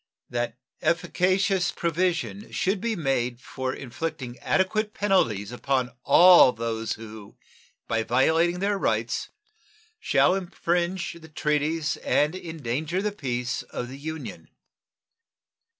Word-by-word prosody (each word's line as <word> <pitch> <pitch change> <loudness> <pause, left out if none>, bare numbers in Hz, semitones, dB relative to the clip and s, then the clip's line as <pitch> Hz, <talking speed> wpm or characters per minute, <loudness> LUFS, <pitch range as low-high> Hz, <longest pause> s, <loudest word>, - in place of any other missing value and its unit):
And - - -13
that 120 -1 -1 0.2
efficacious 185 +2 +1
provision 175 +4 -1
should 190 +1 0
be 230 -1 -1
made 125 - -1
for 130 0 -4
inflicting 130 -1 -5
adequate 210 +3 0
penalties 120 - +1
upon 125 0 -1
all 175 -7 +8
those 115 -1 -2
who, 110 -2 -11 0.5
by 115 -1 +1
violating 160 +10 +2
their 200 0 +1
rights, - - -1 0.7
shall 180 - +3
infringe 175 -1 -1
the 160 - -13
treaties 150 +1 0
and 150 +2 +1
endanger 160 -1 -3
the 210 +2 -1
peace 125 -8 -3
of 120 - -6
the 135 - -8
Union. 160 +1 -7
160 Hz, 115 wpm, -26 LUFS, 125-185 Hz, 0.7 s, all